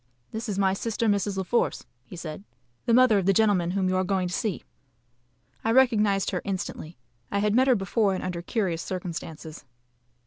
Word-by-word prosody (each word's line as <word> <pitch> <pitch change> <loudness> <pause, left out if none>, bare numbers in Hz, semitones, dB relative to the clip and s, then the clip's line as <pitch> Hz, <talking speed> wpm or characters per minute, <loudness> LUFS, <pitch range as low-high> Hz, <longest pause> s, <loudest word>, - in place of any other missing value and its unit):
"This 220 0 -5
is 200 - -2
my 190 -1 +3
sister, 230 +3 -2
Mrs. 205 -1 +1
La 190 - 0
Force," 235 +6 0 0.3
said 160 -3 -6
he, 200 - -24 0.3
"the 235 - +3
mother 250 -5 +5
of 190 - -2
the 195 - +5
gentleman 195 -4 +3
whom 190 +1 0
you 185 - +1
are 185 - +2
going 185 -1 0
to 175 - -5
see." 215 -3 -2 1.0
I 225 - +1
recognised 215 -6 +3
her 180 - -2
instantly. 185 -4 -5 0.3
I 200 - -1
had 205 +1 +1
met 260 +3 +4
her 255 - +5
before 195 0 +1
and - - -5
under 180 -2 -3
curious 180 -4 -1
circumstances. 165 -3 -6
195 Hz, 195 wpm, -26 LUFS, 185-220 Hz, 1.0 s, mother